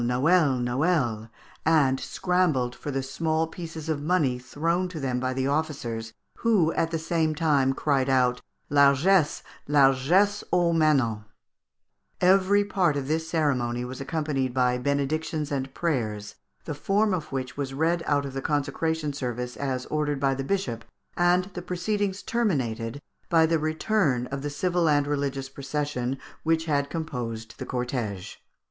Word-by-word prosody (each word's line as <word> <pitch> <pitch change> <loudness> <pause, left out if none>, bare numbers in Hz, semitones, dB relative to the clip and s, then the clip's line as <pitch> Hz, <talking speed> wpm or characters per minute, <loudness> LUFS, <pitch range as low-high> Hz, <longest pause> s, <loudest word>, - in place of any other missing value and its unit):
Noel! 135 +4 +3
Noel!_" 120 -3 0 0.3
and 145 -5 +3
scrambled 165 -10 0
for 145 - -7
the 135 -1 -2
small 160 +4 0
pieces 160 -1 -8
of 155 -3 -1
money 150 -6 +1
thrown 165 +8 -1
to 175 -3 -6
them 130 -3 -1
by 130 0 -1
the 130 0 -1
officers, 135 -7 -2 0.3
who 200 -9 +2
at 165 - 0
the 165 - -1
same 160 -1 0
time 145 -4 +2
cried 135 -1 +1
out, 125 -2 +2 0.3
"Largesse, 145 +4 +4 0.2
largesse 145 +8 +3
aux 175 -1 +3
manants!" 135 -9 +2 1.0
Every 195 +2 +4
part 180 -7 +1
of 135 -1 -3
this 160 +2 -1
ceremony 125 -7 0
was 130 +2 -7
accompanied 135 -4 -2
by 125 -1 +2
benedictions 145 +3 -1
and 135 -1 -2
prayers, 110 -11 -2 0.3
the 155 - -3
form 200 +7 +1
of 165 -4 -3
which 130 -2 -4
was 135 -2 -4
read 165 +3 +1
out 145 -1 +2
of 135 - -6
the 135 - -3
consecration 150 +2 -1
service 125 -2 -4
as 130 -2 -3
ordered 150 -2 -1
by 135 -1 +2
the 135 0 -3
bishop, 135 - -2 0.3
and 175 +1 +3
the 175 - -5
proceedings 190 +2 -2
terminated 135 - -1 0.3
by 165 -1 +5
the 165 0 +1
return 155 - +1
of 140 0 -3
the 145 - -3
civil 170 +2 +1
and 145 -1 +3
religious 140 -2 -2
procession 135 -2 -3 0.2
which 160 0 +1
had 140 -3 0
composed 120 -8 -5
the - - -5
cortège. 125 -6 -3
145 Hz, 150 wpm, -26 LUFS, 130-165 Hz, 1.0 s, by